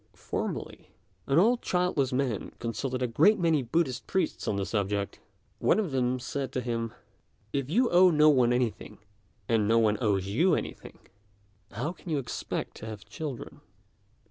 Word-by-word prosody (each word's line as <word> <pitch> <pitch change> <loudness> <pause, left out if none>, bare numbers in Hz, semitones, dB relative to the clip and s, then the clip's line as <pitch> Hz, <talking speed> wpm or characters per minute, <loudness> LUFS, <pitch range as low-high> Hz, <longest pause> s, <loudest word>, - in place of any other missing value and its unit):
Formerly, - - -5 0.4
an 135 - +2
old 235 +7 +4
childless 180 -7 0
man 125 -5 -1
consulted 125 +2 -3
a - - +1
great 165 - +4
many 165 -5 +2
Buddhist 130 -1 -1
priests 185 -4 -1
on 105 - +1
the 100 -1 -1
subject. 100 -1 -2 0.4
One - - +3
of 205 -8 -1
them 130 -1 +1
said 135 +2 -4
to 130 - -1
him, 115 -2 -2 0.6
"If 140 -1 -1
you 240 +10 +3
owe 180 +1 +7
no 155 -2 +5
one 130 -5 +5
anything, 120 -4 -1 0.5
and 110 -3 +2
no 115 +1 +4
one 110 -2 +3
owes 100 -5 +1
you 155 - +3
anything, - - -6 0.7
how 125 +10 -3
can 180 - -11
you 155 - +1
expect 135 -3 -4
to 110 - -8
have 110 -1 -8
children? 140 +4 -7
130 Hz, 165 wpm, -28 LUFS, 115-160 Hz, 0.7 s, owe